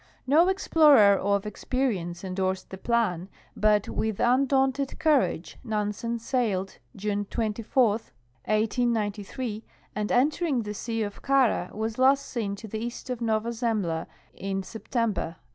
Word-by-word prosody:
No 310 +7 +5
explorer 300 - +5
of 200 +1 0
experience 205 -6 -2
endorsed 190 0 -2
the 190 - -6
plan, 200 -7 0 0.3
but 210 -1 +3
with 220 -2 -2
undaunted 265 +2 +2
courage 295 - +1
Nansen 215 +2 -2
sailed 220 -6 -1 0.2
June 205 0 -2
24, 225 +1 +1 0.5
1S93, 215 0 -1 0.3
and 210 0 -2
entering 285 0 +2
the 210 0 -5
sea 225 +1 -3
of 205 -1 -6
Kara 260 -9 +2
was 220 +2 -4
last 275 +2 +4
seen 210 -5 -3
to 220 +2 -9
the 220 +1 -4
east 240 +2 -5
of 245 -1 -4
Nova 220 0 0
Zernbla 220 -9 -1 0.3
in 195 0 -3
September, 225 +3 -2
1893. 165 +1 -5
220 Hz, 130 wpm, -27 LUFS, 200-250 Hz, 0.5 s, No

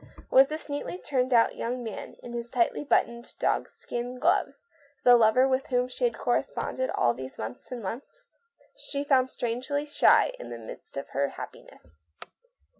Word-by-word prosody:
Was 265 +1 +7
this 310 +2 -6
neatly 290 +4 -4
turned 260 -7 -1
out 230 -2 +4
young 245 +1 -3
man, 220 -3 -7
with 240 - -8
his 235 0 -4
tightly 235 +4 +1
buttoned 235 -4 0
dog - - 0
skin 245 +1 -5
gloves, 345 -1 +1 0.4
the 245 -1 +8
lover 235 +3 +5
with 265 +1 0
whom 250 -1 +1
she 255 - -2
had 480 - 0
corresponded 260 0 -1
all 120 -1 +3
these 130 +1 -8
months 110 - -7
and 245 -3 -5
months? 230 +8 -7 0.5
She 285 - -4
felt 260 -3 +3
strangely 255 +6 -2
shy 300 +10 +4
in - - -8
the 120 - -6
midst 115 +4 -9
of 140 - -5
her 140 +1 0
happiness. 80 0 -11
250 Hz, 170 wpm, -28 LUFS, 230-280 Hz, 0.5 s, the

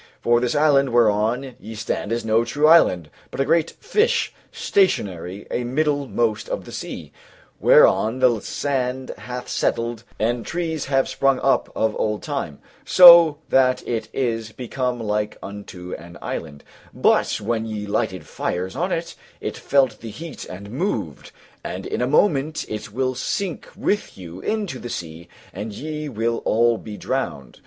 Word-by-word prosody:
For 120 0 +3
this 125 +4 -1
island 145 -2 +4
whereon 120 +3 +2
ye 110 +2 -9
stand 105 -1 -3
is 115 0 -1
no 110 +1 +3
true 145 +6 0
island, 90 - +5 0.2
but - - -8
a 135 - +2
great 165 +1 +2
fish 440 +1 +1 0.2
stationary 105 - 0
a 120 - -1
middlemost 130 -4 0
of - - -3
the - - -10
sea, - - -7 0.5
whereon 115 +4 +5
the 125 -3 +3
sand 130 0 -2
hath 125 0 -7
settled 115 -1 -1
and 120 +1 0
trees 160 +3 -3
have 135 -1 +1
sprung 135 -1 +2
up 135 - +2
of 110 -1 0
old 105 -1 -1
time, 140 - -4 0.3
so 170 -4 +9
that 130 -1 +3
it 115 -2 -2
is 115 -4 -2
become 125 +1 -3
like 105 -1 -2
unto 95 -3 -8
an 85 +1 -9
island; 75 -3 -6 0.3
but - - +2
when 115 -1 -2
ye 105 -1 -4
lighted 100 - -2
fires 90 +5 -3
on 175 +6 -1
it, 165 -1 -2 0.3
it - - -4
felt 130 -5 +1
the 115 - -8
heat 155 +6 -8
and 100 +3 -9
moved; 130 - -3 0.3
and - - -5
in - - -3
a 125 - +1
moment 150 0 +2
it 105 0 -6
will 130 +3 -1
sink 185 +7 -3
with 205 - -1
you 90 -1 -9
into 205 - -2
the 120 - -7
sea 85 -3 -7 0.2
and 105 +3 -6
ye 150 +4 -5
will 115 -1 -1
all 115 +1 +2
be 105 -2 -8
drowned. 130 - -4
120 Hz, 160 wpm, -22 LUFS, 105-145 Hz, 0.5 s, so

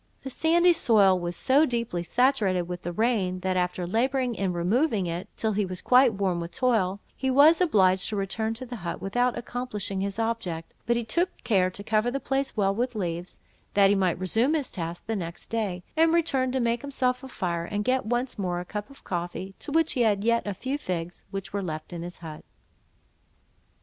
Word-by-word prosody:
The 265 - -5
sandy 340 +5 +4
soil 205 - +4
was 175 0 -3
so 270 - +4
deeply 235 - -1
saturated 205 -2 +2
with 175 +1 -6
the 175 - -4
rain, 190 -3 0
that, 190 0 0
after 180 0 -1
labouring 250 +6 0
in 195 -4 -1
removing 200 - +1
it 170 +1 -4
till 220 - 0
he 210 0 +1
was 185 -1 -4
quite 250 -3 +5
worn 190 -3 0
with 170 0 -6
toil, 215 -7 +1 0.2
he 265 - -1
was 295 +6 +6
obliged 190 - +3
to 215 - -3
return 220 +3 -2
to 255 +3 -6
the 245 -1 -7
hut, 175 -4 -5
without 245 +5 0
accomplishing 235 -5 -3
his 200 +1 -3
object; 225 -8 -3
but 235 - +3
he 235 - -1
took 345 +11 +1
care 195 -6 +3
to 200 +2 -6
cover 220 +2 +1
the 275 +3 -2
place 270 -2 -2
well 195 -2 +2
with 245 +3 -2
leaves, 175 -3 -4 0.4
that 200 -1 +6
he - - +4
might 185 -3 +1
resume 225 - +2
his 290 -5 -2
task 170 -1 -5
the 225 - -2
next 170 -4 -6
day: 200 -6 -2
and 325 +1 +4
returned 270 -7 +1
to 265 - +1
make 235 -1 0
himself 260 -2 -1
a - - -7
fire, 175 -8 -3
and 205 +3 -3
get 260 0 +2
once 240 +1 -2
more 180 -2 -1
a 180 - -6
cup 210 +5 -5
of 275 - -16
coffee, 175 +2 -4
to - - -5
which 325 +1 +2
he 250 - 0
had 205 -3 +2
yet 235 -1 +2
a 205 - -2
few 265 +8 -3
figs, 175 -6 -4
which 195 -1 -6
were 200 - -1
left 160 -1 -5
in 170 - -5
his 175 +1 -7
hut. 160 -3 -9
210 Hz, 210 wpm, -26 LUFS, 185-250 Hz, 0.4 s, was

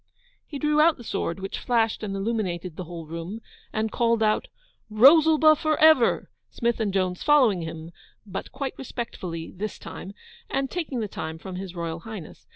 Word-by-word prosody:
He 290 - -6
drew 300 +1 +2
out 325 0 +5
the 240 - -11
sword, 195 -4 -3
which 195 +1 -5
flashed 225 -2 +1
and 200 -2 -3
illuminated 195 -5 -2
the 180 - -6
whole 165 -1 -8
room, 165 +7 -6 0.3
and 220 0 -1
called 230 -1 +2
out 215 0 +1 0.4
'Rosalba 310 +7 +7
for 310 +1 0
ever!' 310 -6 +5 0.2
Smith 235 -1 -1
and 215 -3 0
Jones 185 -2 -1
following 255 - +4
him, 160 0 -7 0.3
but 195 -2 -6
quite 270 0 -4
respectfully 185 -10 -5
this 210 +3 -4
time, 195 +2 -9 0.3
and 270 0 -1
taking 300 -9 -3
the 215 - -2
time 160 -4 -5
from 185 +2 -7
His 185 -1 -7
Royal 170 -1 -4
Highness. 210 -3 -10
215 Hz, 170 wpm, -25 LUFS, 180-265 Hz, 0.4 s, Rosalba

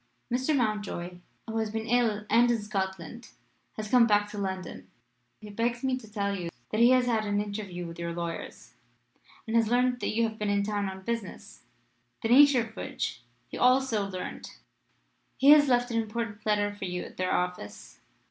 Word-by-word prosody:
"Mr. 260 +4 +1
Mountjoy, 205 -6 -2 0.3
who 225 0 -3
has 220 -1 -1
been 220 +1 -4
ill 225 -3 +1
and 235 +3 +4
in 235 -1 +2
Scotland, 195 +1 -4 0.5
has 215 -1 -6
come 245 -2 +6
back 205 -1 +3
to 210 - -8
London. 185 - -5 0.5
He 210 -1 -10
begs 235 +3 -1
me 260 -1 +1
to 220 -4 -12
tell 200 -1 -1
you 175 -3 -4 0.2
that 215 - -1
he 240 - +7
has 255 -1 +4
had 225 -3 +1
an 205 -1 0
interview 200 -4 -5
with 165 0 -9
your 170 0 -3
lawyers, 170 -1 -6 0.7
and 225 - -3
has 230 -1 +4
learned 245 +1 +2
that - - -2
you 230 0 +2
have 220 0 -9
been 210 -1 -1
in 200 0 +1
town 205 -1 -1
on 190 0 -9
business, 230 -2 -6 0.6
the 225 - 0
nature 275 0 +7
of 225 0 -8
which - - -4 0.3
he - - -8
has - - -6
also 250 -5 +3
learned. 185 -1 -6 0.9
He 275 +2 +6
has 295 -1 +7
left 245 -1 +2
an 230 0 +1
important 220 -1 -5
letter 205 -1 +1
for 205 -1 -6
you 180 -1 -3
at - - -12
their 185 0 -1
office. 180 - -4
215 Hz, 195 wpm, -28 LUFS, 195-235 Hz, 0.9 s, he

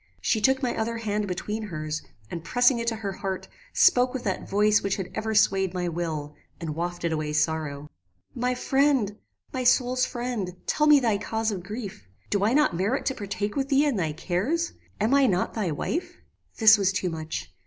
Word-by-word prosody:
She 220 - +1
took 265 +4 +3
my 245 - 0
other 230 +1 -2
hand 210 -2 -2
between 210 +4 -3
her's, 155 -6 -4 0.3
and 170 -2 -5
pressing 245 +4 +3
it 230 - -3
to 230 - +1
her 210 -3 -4
heart, 190 -1 -4 0.2
spoke 250 - +4
with 255 - -3
that 190 - -3
voice 210 +1 +3
which 200 0 0
had 190 -3 -5
ever 220 0 -2
swayed 190 -3 +3
my 180 -1 -1
will, 160 -3 -3 0.3
and 165 -2 -4
wafted 170 +1 -2
away 155 -1 -2
sorrow. 150 -2 -1 0.5
"My 250 0 -1
friend! 265 -6 +2 0.4
my 255 - -2
soul's 255 0 +3
friend! 240 -7 -3
tell 300 0 +2
me 300 -1 +8
thy 225 -6 +1
cause 220 +1 -1
of 190 -3 -4
grief. 200 - -7 0.2
Do 200 -1 +1
I 215 - +3
not 300 - +3
merit 205 +10 0
to 265 - +1
partake 205 -1 -4
with 275 -1 -1
thee 280 +2 +4
in 285 -4 +1
thy 165 -6 0
cares? 200 - -1 0.3
Am 220 +5 +2
I 280 -1 +5
not 185 -4 0
thy 210 -6 -1
wife?" 295 - -3 0.4
"This 220 -1 +7
was 195 -1 +3
too 185 -2 -1
much. 155 - -5
210 Hz, 195 wpm, -26 LUFS, 175-245 Hz, 0.5 s, me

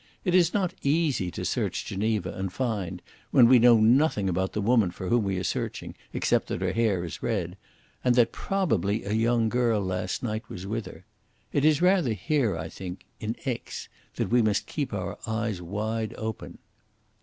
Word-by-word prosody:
It 180 - +1
is 175 -2 +5
not 190 -4 0
easy 140 - +1
to - - -5
search - - -1
Geneva 105 -2 -1
and 95 -1 -4
find, 95 -7 -3 0.3
when 125 -4 +6
we 125 0 +7
know 120 0 +7
nothing 115 -2 +3
about 95 +1 -1
the - - -2
woman 110 -2 +3
for 90 +1 -6
whom 120 -2 +3
we 95 -1 -1
are 90 - -2
searching, - - -3 0.2
except - - +1
that - - -3
her 95 0 0
hair 110 -6 +1
is 85 - -7
red, 95 -6 -2 0.5
and 125 -1 +3
that 120 -2 +4
probably 110 - 0
a 100 - -4
young 115 +1 +2
girl 115 -2 +2
last 90 +1 -2
night 110 -2 -3
was 90 - -7
with 110 +2 -3
her. - - -12 0.5
It 140 - +2
is 155 +1 +4
rather 180 - +4
here, 110 - 0
I 80 0 -4
think 90 +2 -8
in 110 0 -3
Aix 125 -4 -4 0.3
that - - -2
we 120 0 +5
must 105 -2 +1
keep 145 -4 -3
our 95 -4 -4
eyes 110 -4 -2
wide 110 +5 -3
open." 110 -1 -5
110 Hz, 190 wpm, -27 LUFS, 95-125 Hz, 0.5 s, we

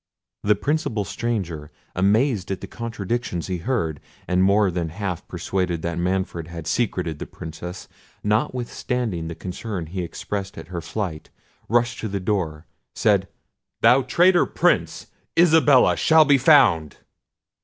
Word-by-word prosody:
The 105 +1 +3
principal 120 -2 -1
stranger, 90 -8 -3 0.3
amazed 105 +2 +2
at 95 -1 -2
the - - -5
contradictions 115 -5 -4
he 90 -2 -2
heard, 80 - -1 0.3
and 90 0 +2
more 100 +1 +4
than 85 -2 -2
half 90 0 -5
persuaded 90 -1 -2
that 85 0 -2
Manfred 90 -2 -2
had 85 -1 -8
secreted 90 -5 -1
the - - -6
Princess, 85 +3 -8 0.4
notwithstanding 115 -3 -1
the 85 - -6
concern 95 0 -5
he 90 +4 -5
expressed 95 +3 -5
at 80 - -9
her 85 -2 -4
flight, 85 -1 -5 0.4
rushing 120 +1 +1
to 110 - -3
the 100 - -1
door, 90 -5 -2 0.3
said— 100 -3 +2 0.5
"Thou 130 +2 +6
traitor 175 +6 +4
Prince! - - +1 0.3
Isabella 160 -6 +5
shall 160 -1 +5
be 140 -1 +4
found." 120 - +4
95 Hz, 135 wpm, -23 LUFS, 85-120 Hz, 0.5 s, Thou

